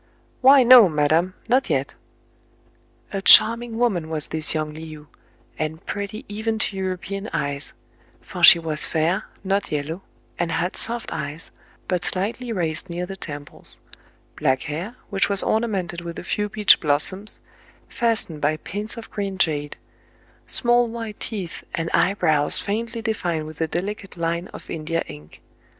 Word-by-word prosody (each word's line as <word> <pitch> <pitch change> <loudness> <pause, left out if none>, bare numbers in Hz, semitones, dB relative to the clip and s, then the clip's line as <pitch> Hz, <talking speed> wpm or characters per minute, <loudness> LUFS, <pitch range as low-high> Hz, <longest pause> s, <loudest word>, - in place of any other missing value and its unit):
"Why 265 0 +7
no, 240 -5 +9
madam, 160 +4 +1
not 255 +3 +2
yet! - - -1 0.6
" - - -29
A 195 - -2
charming 230 +3 +7
woman 195 -10 0
was 155 -2 -3
this 160 0 0
young 155 -1 -2
Le 155 - -9 0.2
ou, 150 0 -16 0.5
and 155 +2 -4
pretty 205 +5 -5
even 220 +2 -2
to 210 -2 -1
European 190 +2 -4
eyes: 140 0 -3 0.4
for - - -8
she - - +11
was 160 -2 -2
fair, 165 +3 0 0.2
not 195 +1 -1
yellow, 155 +4 -3 0.4
and 170 -1 -1
had 175 +3 -1
soft 235 +1 -4
eyes, 150 +1 -6 0.4
but 180 -1 -1
slightly 225 +6 -2
raised 175 -3 -2
near 175 +1 -3
the 195 +1 -7
temples; 145 -5 -8 0.6
black 130 0 +1
hair, 170 +10 -5 0.2
which 195 0 +2
was 200 -1 +2
orna 220 +2 +1
mented 180 -5 -3
with 170 -1 -7
a - - -6
few 210 +2 -2
peach 210 0 +5
blossoms, 175 +7 0 0.5
fastened 225 - 0
by 150 +2 +1
pins 205 +8 -5
of 230 - -9
green 195 -2 -4
jade; 150 -5 -1 0.7
small 240 -1 +4
white 225 -2 -7
teeth, 195 -7 -5
and 165 0 -3
eye 190 +2 +3
brows 155 -6 +2
faintly 230 +2 -3
defined 175 -8 -2
with 155 +1 -9
a 160 - +1
delicate 195 +3 -5
line 170 +2 -2
of - - -12
India 165 +1 -2
ink. 75 +1 -13
185 Hz, 160 wpm, -23 LUFS, 160-215 Hz, 0.7 s, she